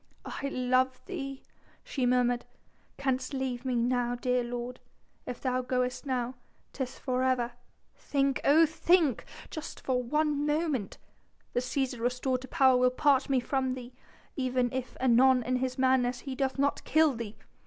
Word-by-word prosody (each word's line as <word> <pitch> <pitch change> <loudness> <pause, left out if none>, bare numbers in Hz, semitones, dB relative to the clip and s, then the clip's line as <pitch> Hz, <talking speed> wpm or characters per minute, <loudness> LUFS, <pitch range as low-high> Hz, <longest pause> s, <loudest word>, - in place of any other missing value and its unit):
"I 280 - -4
love 255 0 +1
thee," 275 -8 -6 0.4
she 255 -3 -1
murmured, 245 -1 +2 0.5
"canst 265 +1 -1
leave 260 -2 -2
me 255 -2 -1
now, 245 0 +1
dear 250 0 0
lord.... 245 +1 -5 0.5
If 250 - -5
thou 255 -1 0
goest 250 +2 -2
now 250 -1 -1 0.4
'tis 265 -2 -4
for 255 -2 -1
ever... 255 -2 +1 0.4
think, 275 -1 0
oh 315 +4 +6
think! 320 -3 +2 0.3
just 315 - -6
for 255 -1 0
one 295 +3 0
moment... 295 - -1 0.6
the - - +2
Cæsar 255 0 -2
restored 250 +2 0
to 260 - -9
power 265 -5 +4
will 250 0 +4
part 270 +1 +2
me 265 -2 +3
from 260 +1 -1
thee... 250 -1 -9 0.4
even 255 -3 0
if 255 -1 -4
anon 255 0 +5
in 255 +2 0
his 255 0 -2
madness 255 -1 +2
he 270 - -5
doth 265 +1 -1
not 280 +1 +1
kill 315 -2 +4
thee. 225 -3 -6
255 Hz, 155 wpm, -29 LUFS, 250-275 Hz, 0.6 s, oh